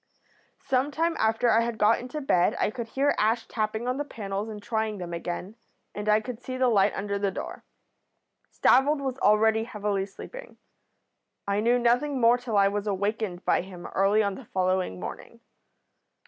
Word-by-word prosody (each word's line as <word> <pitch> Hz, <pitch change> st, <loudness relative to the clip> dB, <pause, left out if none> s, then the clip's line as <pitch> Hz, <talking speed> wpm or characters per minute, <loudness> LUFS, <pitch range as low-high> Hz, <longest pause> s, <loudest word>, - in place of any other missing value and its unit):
"Some 265 Hz, +2 st, +1 dB
time 330 Hz, +3 st, 0 dB
after 225 Hz, +2 st, +2 dB
I 225 Hz, -, +4 dB
had 235 Hz, -1 st, -2 dB
got 215 Hz, +2 st, +4 dB
into 255 Hz, +5 st, -6 dB
bed 180 Hz, -10 st, +2 dB
I -, -, +1 dB
could 235 Hz, -1 st, -5 dB
hear 275 Hz, +5 st, +1 dB
Ash 225 Hz, +2 st, +1 dB
tapping 220 Hz, +1 st, -2 dB
on 250 Hz, +1 st, 0 dB
the 290 Hz, -, -1 dB
panels 205 Hz, -5 st, -5 dB
and 215 Hz, -1 st, -7 dB
trying 220 Hz, 0 st, -2 dB
them 175 Hz, -2 st, -6 dB
again, 175 Hz, +4 st, -5 dB, 0.4 s
and 210 Hz, +1 st, -3 dB
I 210 Hz, +1 st, +4 dB
could 245 Hz, 0 st, -7 dB
see 255 Hz, 0 st, -5 dB
the 255 Hz, -1 st, +3 dB
light 200 Hz, -4 st, +4 dB
under 200 Hz, 0 st, -2 dB
the 200 Hz, 0 st, +1 dB
door. 190 Hz, -, -7 dB, 0.8 s
Stavold 285 Hz, +3 st, +3 dB
was 265 Hz, -1 st, -3 dB
already 220 Hz, +1 st, +3 dB
heavily 205 Hz, -3 st, -2 dB
sleeping. -, -, -11 dB, 0.9 s
I 200 Hz, 0 st, +1 dB
knew 235 Hz, +3 st, +3 dB
nothing 245 Hz, +4 st, +1 dB
more 235 Hz, +1 st, +5 dB
till 240 Hz, -4 st, -2 dB
I 200 Hz, 0 st, +5 dB
was 205 Hz, +1 st, -2 dB
awakened 200 Hz, -2 st, -2 dB
by -, -, +3 dB
him 180 Hz, -1 st, -10 dB
early 200 Hz, +3 st, +3 dB
on 200 Hz, -1 st, -1 dB
the 265 Hz, -, -10 dB
following 185 Hz, -, -1 dB
morning. -, -, -8 dB
220 Hz, 180 wpm, -27 LUFS, 200-245 Hz, 0.9 s, more